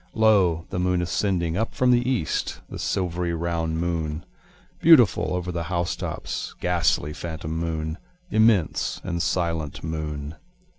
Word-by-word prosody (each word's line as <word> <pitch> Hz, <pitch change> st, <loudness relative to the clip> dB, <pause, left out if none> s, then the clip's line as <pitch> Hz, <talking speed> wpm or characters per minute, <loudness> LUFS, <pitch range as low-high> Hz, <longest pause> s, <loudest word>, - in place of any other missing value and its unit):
Lo, 100 Hz, -7 st, +4 dB
the 95 Hz, -, -2 dB
moon 90 Hz, 0 st, +1 dB
ascending, 90 Hz, -1 st, 0 dB
Up 110 Hz, +4 st, -2 dB
from 125 Hz, 0 st, +3 dB
the 120 Hz, +1 st, +3 dB
east 120 Hz, -12 st, -1 dB
the -, -, -8 dB
silvery 90 Hz, -2 st, -1 dB
round 80 Hz, -1 st, -1 dB
moon, 80 Hz, -2 st, -2 dB, 0.5 s
Beautiful 125 Hz, -, +5 dB
over 90 Hz, 0 st, -3 dB
the 85 Hz, -1 st, -3 dB
house 85 Hz, -1 st, -1 dB
tops, -, -, -5 dB
ghastly, 75 Hz, +1 st, +1 dB
phantom 80 Hz, -1 st, -5 dB
moon, 80 Hz, 0 st, -3 dB, 0.3 s
Immense 110 Hz, -6 st, +2 dB
and 85 Hz, -2 st, -2 dB
silent 85 Hz, -4 st, -1 dB
moon. 75 Hz, -2 st, -4 dB
85 Hz, 135 wpm, -25 LUFS, 80-95 Hz, 0.5 s, Beautiful